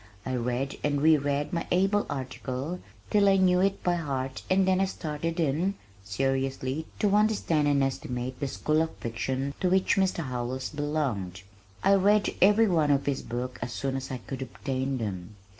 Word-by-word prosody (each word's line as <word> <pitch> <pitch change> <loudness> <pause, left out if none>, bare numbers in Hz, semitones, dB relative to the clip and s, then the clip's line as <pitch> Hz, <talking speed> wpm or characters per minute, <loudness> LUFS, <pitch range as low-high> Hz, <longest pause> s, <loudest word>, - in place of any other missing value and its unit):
I 130 - -2
read 125 +3 -2
and 145 -1 +1
re 155 +2 +6
read 145 +3 -1
my 170 - -2
"able 195 +3 +2
article" 135 +4 -4 0.3
till 205 -2 +5
I 195 - +5
knew 180 -1 +4
it 195 +1 +1
by 175 -1 +2
heart 135 -4 -3
and 190 0 +3
then 190 0 +3
I - - +4
started 165 -2 -4
in, 165 +6 +1 0.3
seriously, 135 +6 -1
to 205 -1 +2
understand 205 -8 +2
and 140 -1 +3
estimate 125 -1 -3
the 140 - -1
school 155 +3 +1
of 160 - -2
fiction 130 +4 -3
to 185 - +1
which 190 +2 +3
Mr. 190 -3 +1
Howells 125 0 -3
belonged. 140 - -2 0.4
I 200 - +5
read 200 +2 +3
every 210 +4 +6
one 160 -6 +2
of 140 -1 +2
his 140 -2 -1
books 125 +2 -5
as 115 0 -4
soon 135 -1 -2
as 135 0 -4
I 130 - -3
could 130 +2 -7
obtain 130 +1 -3
them. 100 -3 -5
145 Hz, 180 wpm, -28 LUFS, 130-180 Hz, 0.4 s, re